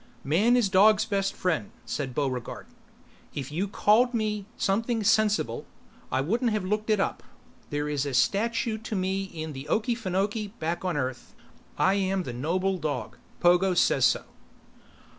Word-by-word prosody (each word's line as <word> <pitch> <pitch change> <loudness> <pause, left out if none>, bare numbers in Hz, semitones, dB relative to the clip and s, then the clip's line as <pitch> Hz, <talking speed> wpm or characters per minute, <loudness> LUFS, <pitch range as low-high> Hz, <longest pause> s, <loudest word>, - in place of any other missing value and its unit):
"Man 205 - +3
is 240 -5 +3
dog's 205 +3 +5
best 195 -1 -1
friend," 160 - -1 0.2
said 130 -4 -4
Buregarde. 130 -4 -3 0.7
"If 140 0 -5
you'd 190 +6 -2
called 235 +5 +3
me 210 -3 -1
something 225 +3 0
sensible, 210 - +2 0.4
I 130 - +1
wouldn't 230 - +1
have 210 -3 -1
looked 210 +3 -1
it 215 -2 +3
up. - - -1 0.5
There 145 0 -2
is 145 -2 -1
a 135 - -2
statue 220 - +1
to 220 0 -5
me 190 +1 -1
in 160 -4 -6
the 135 +1 -8
Okeefenokee 210 -1 -1
back 165 +3 -3
on 180 -4 -1
Earth. 130 -3 -4 0.4
I 190 - +3
am 195 -1 0
the 125 - -6
noble 180 +9 -1
dog. 155 -2 -4 0.2
Pogo 180 +1 +4
says - - +3
so." - - +2
190 Hz, 155 wpm, -27 LUFS, 155-215 Hz, 0.7 s, dog's